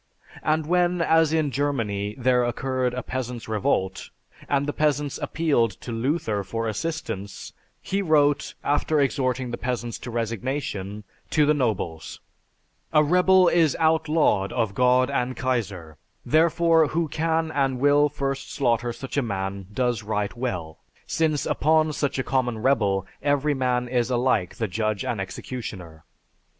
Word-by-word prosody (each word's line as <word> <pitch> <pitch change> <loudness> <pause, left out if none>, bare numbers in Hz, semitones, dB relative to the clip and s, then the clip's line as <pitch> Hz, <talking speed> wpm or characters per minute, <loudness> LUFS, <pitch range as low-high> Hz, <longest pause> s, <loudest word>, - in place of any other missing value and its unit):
And 155 0 +1
when, 180 +1 +2
as 160 -1 +3
in 155 -3 +1
Germany, 110 -7 -1
there 125 -1 +3
occurred 125 +1 -1
a 125 - -3
peasants' 125 -2 -5
revolt, 95 -3 -1 0.4
and 140 0 +1
the 145 - -2
peasants 145 -2 0
appealed 120 - 0
to 120 - -6
Luther 115 -3 -1
for 115 +4 -3
assistance, 105 - -4 0.3
he 195 +1 -1
wrote, 145 -4 +2
after 145 +1 +1
exhorting 130 -3 0
the 120 - -5
peasants 120 -2 -3
to - - -7
resignation, 115 -3 -3 0.3
to 150 -2 +3
the 150 - +4
nobles: 105 - -2 0.7
"A 150 -1 +5
rebel 180 +3 +5
is 165 -4 +3
outlawed 160 -10 +2
of 115 -5 0
God 125 +3 +3
and 130 -2 -1
Kaiser, 100 - -3 0.3
therefore 165 0 +4
who 165 +2 -1
can 160 +1 0
and 135 -3 0
will 145 +2 +4
first 135 -1 -3
slaughter 120 -3 0
such 135 +3 -7
a - - +4
man 95 -4 -4
does 120 0 0
right 105 0 -2
well, 90 -11 -4 0.3
since 155 -3 0
upon 155 0 +2
such 145 -1 -1
a 130 - 0
common 125 -3 0
rebel 105 -6 +1 0.2
every 145 +1 +1
man 125 -2 0
is 120 0 0
alike 120 -7 +1
the 115 -3 -2
judge 110 +2 -2
and 115 -5 -2
executioner. 95 -6 -7
130 Hz, 145 wpm, -24 LUFS, 110-150 Hz, 0.7 s, A